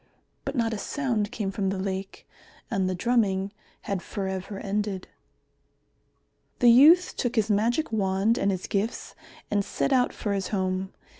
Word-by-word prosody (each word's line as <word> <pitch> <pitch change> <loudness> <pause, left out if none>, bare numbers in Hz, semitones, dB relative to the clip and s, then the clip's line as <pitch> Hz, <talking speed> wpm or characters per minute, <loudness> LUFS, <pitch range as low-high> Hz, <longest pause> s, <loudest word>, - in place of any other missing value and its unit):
But 275 - -3
not 230 -2 +1
a 215 - -3
sound 235 -7 -1
came 210 -5 -3
from 195 -1 -1
the 195 - -2
lake, 190 0 -5 0.4
and 190 -4 +1
the 185 - -1
drumming 200 -2 +1 0.3
had 195 -3 -3
for 195 0 -4
ever 190 +1 -4
ended. 200 -1 -3 1.5
The 240 -2 +6
youth 315 +9 +7
took 245 -1 -2
his 220 -1 +2
magic 235 +9 +1
wand 200 +2 +1
and 200 - +2
his 185 -2 -2
gifts 210 +3 -2 0.4
and 205 -1 +2
set 270 - -1
out 250 -1 +3
for 205 - -3
his 195 -2 -1
home. 190 -1 -1
205 Hz, 160 wpm, -26 LUFS, 190-235 Hz, 1.5 s, youth